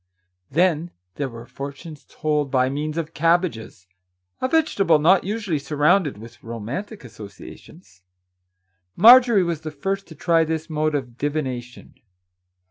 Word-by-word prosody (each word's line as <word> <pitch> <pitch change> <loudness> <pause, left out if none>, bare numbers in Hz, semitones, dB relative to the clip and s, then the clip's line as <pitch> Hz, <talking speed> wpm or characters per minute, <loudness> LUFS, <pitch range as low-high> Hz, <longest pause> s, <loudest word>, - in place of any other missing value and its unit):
Then 170 +1 +1 0.2
there 140 +4 -3
were 115 -1 -10
fortunes 140 +3 -9
told 150 -3 -1
by 130 -1 +2
means 150 +3 -4
of 165 -1 -4
cabbages, 165 - 0 0.3
— 90 0 -49
a - - +1
vegetable 230 - +2
not 175 +5 +4
usually 205 -6 -2
surrounded 150 - +1
with 115 +3 -13
romantic 120 - -6
associations. 100 -4 -13 0.9
Marjorie 235 0 +7
was 170 -3 -3
the 160 - -5
first 195 +7 -4
to 160 - -12
try 165 +1 +2
this 160 +1 -4
mode 155 0 0
of 125 -4 -5
divination. 130 -4 -4
150 Hz, 130 wpm, -22 LUFS, 130-175 Hz, 0.9 s, Marjorie